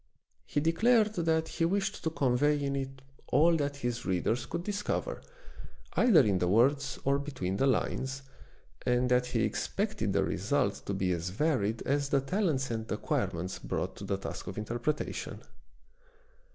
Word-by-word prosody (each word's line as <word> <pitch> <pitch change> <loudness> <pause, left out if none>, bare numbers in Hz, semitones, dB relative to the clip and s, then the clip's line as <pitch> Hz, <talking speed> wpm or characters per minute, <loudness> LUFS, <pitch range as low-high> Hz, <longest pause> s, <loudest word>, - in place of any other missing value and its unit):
He 145 - 0
declared 215 +8 +3
that 160 -3 +1
he 165 - -2
wished 195 +3 -1
to 160 - +1
convey 145 0 +2
in 140 0 -1
it 135 -1 -5 0.2
all 165 +5 +4
that 145 -1 -1
his 120 -3 -3
readers 110 +7 0
could 170 - -3
discover, 205 - -2 0.7
either 225 -11 +6
in 100 -7 +2
the 90 - +1
words 135 +8 +3
or 140 +1 +2
between 130 -10 -3
the 135 - +3
lines, 135 +1 -1 0.6
and 125 0 +2
that 125 0 +3
he - - 0
expected - - -1
the - - +2
result 100 +1 -1
to 100 - -1
be 95 -1 0
as 85 0 -2
varied 115 - 0
as 140 0 0
the 140 - +3
talents 135 - 0
and 110 -1 -4
acquirements 90 +3 -2
brought - - -3
to - - -8
the - - -1
task - - -6
of - - -6
interpretation. 120 +7 -3
135 Hz, 160 wpm, -30 LUFS, 115-160 Hz, 0.7 s, either